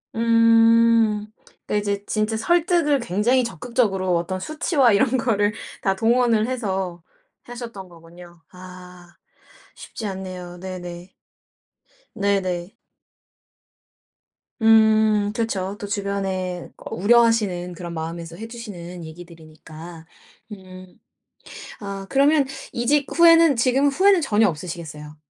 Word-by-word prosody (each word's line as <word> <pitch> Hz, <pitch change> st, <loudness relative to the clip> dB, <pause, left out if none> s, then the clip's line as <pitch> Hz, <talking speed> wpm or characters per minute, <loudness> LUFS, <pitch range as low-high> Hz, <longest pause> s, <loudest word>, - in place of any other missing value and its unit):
음. 230 Hz, -1 st, +4 dB, 0.4 s
그러니까 -, -, -3 dB
이제 205 Hz, -1 st, -2 dB
진짜 215 Hz, +1 st, -1 dB
설득을 335 Hz, +1 st, +2 dB
굉장히 235 Hz, +4 st, +1 dB
적극적으로 230 Hz, -6 st, -1 dB
어떤 180 Hz, +2 st, -3 dB
수치와 295 Hz, -, +1 dB
이런 245 Hz, +5 st, +2 dB
거를 210 Hz, -4 st, +1 dB, 0.3 s
다 195 Hz, -1 st, 0 dB
동원을 230 Hz, 0 st, +2 dB
해서 190 Hz, -8 st, -3 dB, 0.4 s
하셨던 230 Hz, -6 st, -9 dB
거군요. 170 Hz, 0 st, -16 dB
아. 180 Hz, -1 st, -13 dB, 0.6 s
쉽지 220 Hz, -, -9 dB
않네요. 185 Hz, -3 st, -7 dB
네네. 180 Hz, -1 st, -8 dB, 1.0 s
네네. 195 Hz, -2 st, -1 dB, 1.9 s
음. 220 Hz, -2 st, +4 dB
그쵸. 200 Hz, -4 st, -2 dB
또 205 Hz, -, -6 dB
주변에 195 Hz, -3 st, -3 dB
꼭 -, -, -10 dB
우려하시는 210 Hz, -5 st, +2 dB
그런 170 Hz, 0 st, -8 dB
마음에서 165 Hz, +1 st, -6 dB
해 225 Hz, +2 st, -7 dB
주시는 180 Hz, -7 st, -9 dB
얘기들이니까. 160 Hz, 0 st, -12 dB, 0.5 s
음. 185 Hz, -2 st, -12 dB, 0.8 s
아 195 Hz, -1 st, -7 dB
그러면 280 Hz, +1 st, +3 dB, 0.3 s
이직 275 Hz, +4 st, +1 dB
후에는 330 Hz, -3 st, +6 dB
지금 260 Hz, +4 st, +2 dB
후회는 375 Hz, +5 st, +3 dB
전혀 220 Hz, -5 st, +2 dB
없으시겠어요. 155 Hz, -3 st, -7 dB
205 Hz, 245 characters per minute, -22 LUFS, 180-230 Hz, 1.9 s, 후에는